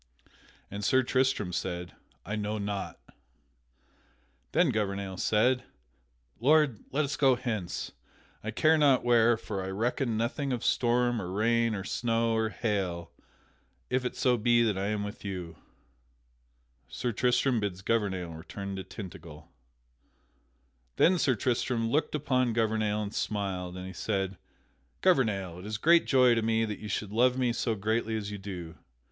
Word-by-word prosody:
And 100 +1 -5
Sir 130 +5 +3
Tristram 130 -7 +1
said, 90 -1 -3 0.3
"I 105 - -3
know 105 0 -2
not." 100 -1 -4 1.5
Then 170 -6 +3
Gouvernail 100 -3 -2
said: 125 +6 +2 0.8
"Lord, 145 -2 +4
let 150 +2 +1
us 145 +1 -3
go 135 -3 +4
hence, 110 -8 -4 0.5
I 110 - -3
care 155 +8 +3
not 140 -3 +4
where, 120 -1 +5
for 100 -4 -5
I 95 - -4
reckon 115 +3 -1
nothing 130 +5 -1
of 120 - -3
storm 120 -1 +2
or 90 - -5
rain 115 +2 +2
or 95 - -4
snow 115 +1 0
or 110 0 +1
hail 95 -6 -2 0.8
if 130 0 +1
it 125 - -3
so 125 -1 +2
be 120 +1 +3
that 110 -3 +1
I 95 +1 -2
am 105 -1 -1
with 105 0 -7
you." 90 -5 -5 1.3
[Sidenote: - - -37
Sir 120 - -2
Tristram 125 +2 +2
bids 95 -3 -3
Gouvernail 95 -6 0
return 95 +5 -7
to 95 - -4
Tintagel] 80 -7 -10 1.5
Then 180 +1 +4
Sir 130 -5 +2
Tristram 115 0 0
looked 150 +2 +1
upon 130 -5 +1
Gouvernail 110 -2 0
and 100 0 -6
smiled, 95 -5 -3
and 90 - -6
he 95 - -7
said: 95 +1 -2 0.6
"Gouvernail, 105 - +2
it 90 - -10
is 105 0 -3
great 170 +8 +4
joy 125 -3 +5
to 115 - +1
me 115 0 +1
that 105 -2 -5
you 105 - -7
should 105 0 -3
love 125 +3 +3
me 125 -2 +1
so 115 -1 -1
greatly 110 +2 -1
as 105 -1 -5
you 105 - -6
do. 90 -4 -7
110 Hz, 155 wpm, -29 LUFS, 100-125 Hz, 1.5 s, where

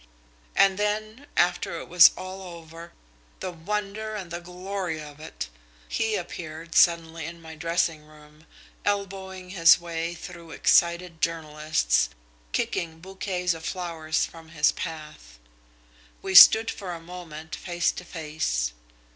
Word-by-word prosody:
And 195 0 +4
then, 215 +6 -2
after 175 -1 +1
it - - -9
was 170 -2 +9
all 185 +1 -7 0.2
over, 165 +1 -12 0.5
the 185 - -4
wonder 210 +5 -4
and 185 -5 -6
the 170 0 -4
glory 180 -1 -4
of 150 -1 -10
it, 155 - -6 0.4
he 220 - 0
appeared 165 -2 -6
suddenly 165 -2 +3
in 170 0 -9
my 160 -1 -10
dressing 165 -1 -1
room, 150 +1 -18 0.4
elbowing 190 -2 -3
his 170 -3 +6
way 170 0 -4
through 170 -1 -10
excited 170 0 +2
journalists, 155 - +1 0.4
kicking 160 - -2
bouquets 180 0 -2
of 165 0 -9
flowers 165 -3 -2
from 165 -1 -13
his 150 -2 +3
path. 150 - -8 0.9
We 190 - -3
stood 220 +4 +10
for 180 -4 -6
a - - -8
moment 165 -2 -10
face 175 -1 0
to - - -8
face. 150 - -2
170 Hz, 130 wpm, -26 LUFS, 160-185 Hz, 0.9 s, stood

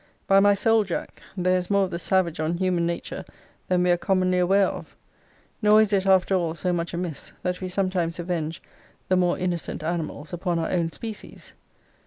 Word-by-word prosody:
By 195 0 +5
my 205 0 +5
soul, 225 +2 +3
Jack, 185 -4 -5 0.2
there 185 0 +2
is 180 - -6
more 200 -1 +3
of 185 - -3
the 170 - -3
savage 175 -2 +1
on 160 +2 -1
human 180 -2 +1
nature 170 0 -4 0.4
than 180 -1 +2
we 180 - +3
are 175 - +3
commonly 185 0 +1
aware 195 +2 +4
of. - - -6 0.7
Nor 210 0 +6
is 215 -1 +3
it, 195 -1 +2
after 190 0 +4
all, 170 -3 0
so 180 +2 -1
much 170 0 -2
amiss, 170 -4 -5
that 180 0 -2
we 185 - -3
sometimes 185 -3 -1
avenge 170 -2 -3 0.5
the 185 - +4
more 180 -1 +2
innocent 175 -3 -3
animals 160 -1 -4
upon 175 0 -1
our 165 - -2
own 170 -2 0
species. 220 +2 -9
180 Hz, 195 wpm, -25 LUFS, 170-190 Hz, 0.7 s, Nor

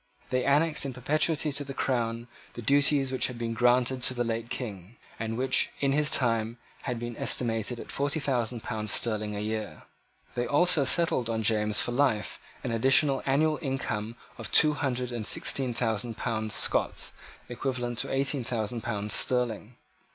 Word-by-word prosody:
They 130 0 +1
annexed 150 +3 +3
in 135 -2 -3
perpetuity 150 +4 +1
to 145 +1 -2
the 135 -1 -8
crown 120 -2 -1 0.3
the - - -7
duties 140 0 +3
which 130 - +1
had 125 - -7
been 115 -1 -3
granted 125 +2 +2
to 130 - +1
the 120 - 0
late 115 0 -3
King, 105 -4 -6 0.2
and 115 0 -3
which 130 +1 +1
in 140 -1 +1
his 150 +1 +2
time 115 -2 +1 0.3
had 125 - -2
been 120 0 -5
estimated 115 0 0
at - - -8
forty 140 +2 0
thousand 125 -5 -1
pounds 105 -1 -2
sterling 105 -2 0
a - - -3
year. 110 -1 -4 0.5
They 120 0 -2
also 150 -1 +4
settled 130 -4 +2
on 110 -1 -1
James 105 -1 +2
for - - -2
life 120 -4 0 0.2
an 125 - -2
additional 135 +4 +3
annual 150 +3 +2
income 120 -6 -3 0.2
of - - -6
two 150 0 +6
hundred 125 -4 -2
and 115 -3 -3
sixteen 130 -2 +1
thousand 115 -1 -2
pounds 110 -3 -1
Scots, - - +1 0.3
equivalent 120 -1 -3
to - - -2
eighteen 135 0 +1
thousand 115 0 -3
pounds 105 -2 -3
sterling. 120 -2 -1
120 Hz, 170 wpm, -28 LUFS, 115-135 Hz, 0.5 s, two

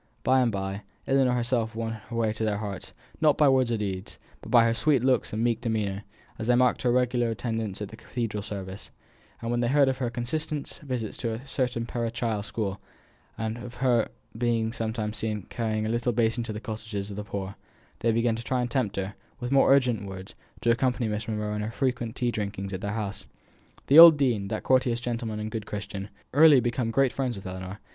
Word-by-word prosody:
By 130 +1 +4
and 120 -2 +2
by, 95 0 -3 0.2
Ellinor 135 -2 +3
herself 120 -2 0
won 115 0 -2
her 115 +2 -9
way 110 -2 +1
to 110 - -4
their 105 -2 +1
hearts, 100 -3 -6 0.3
not 150 -3 +4
by 150 - +5
words 130 -2 +3
or 115 - +1
deeds, 95 -3 -4 0.2
but - - -10
by 120 -2 +6
her 115 0 +3
sweet 135 +1 +2
looks 130 -1 +2
and 110 +2 -1
meek 120 -1 +1
demeanour, 105 -4 -2 0.3
as 110 - -3
they 125 - +5
marked 125 0 +3
her 125 - +2
regular 125 -1 +2
attendance 110 -3 -3
at 105 +2 -8
cathedral 115 -3 -4
service: 95 -1 -7 0.5
and 115 - -2
when 120 - +1
they 120 - +1
heard 140 +2 +4
of 130 0 0
her 125 -3 0
constant 140 +5 -4
visits 125 -7 -4
to 115 -2 -2
a 120 +5 -7
certain 125 -4 -1
parochial 115 -2 -2
school, 100 -2 -4 0.6
and 110 +1 -3
of 120 0 -8
her 125 -3 +2 0.3
being 115 -1 0
sometimes 110 -1 -3
seen 105 -2 -2
carrying 110 -3 -1
a - - -1
little 120 +1 +1
covered 110 - -8
basin 115 +1 +1
to 110 - -4
the 105 - -5
cottages 110 -2 -5
of - - -6
the 105 - -4
poor, 100 -2 -5 0.5
they 115 - +2
began 115 0 +2
to 115 - -6
try 125 +2 0
and 120 -1 -3
tempt 115 -6 0
her, 95 +1 -3 0.3
with 125 0 -4
more 135 -1 +5
urgent 125 -7 +3
words, 95 0 -8 0.3
to 120 - +3
accompany 125 0 +1
Miss 105 +1 -3
Monro 105 -1 -2
in 105 - -2
her 105 - -2
frequent 125 -1 -2
tea 120 -2 0
drinkings 100 -2 -4
at 95 - -4
their 100 -1 -2
houses. 105 -2 -4 0.6
The 145 +4 +7
old 165 -2 +11
dean, 120 -8 +1
that 110 +1 -3
courteous 125 -2 +3
gentleman 115 -3 -3
and 105 0 -4
good 110 -1 -5
Christian, 100 -1 -5
had 100 - -15 0.2
early 150 -1 +8
become 120 -1 -1
great 135 +2 +2
friends 130 -3 -1
with 95 - -9
Ellinor. 95 +1 -6
115 Hz, 220 wpm, -27 LUFS, 105-125 Hz, 0.6 s, old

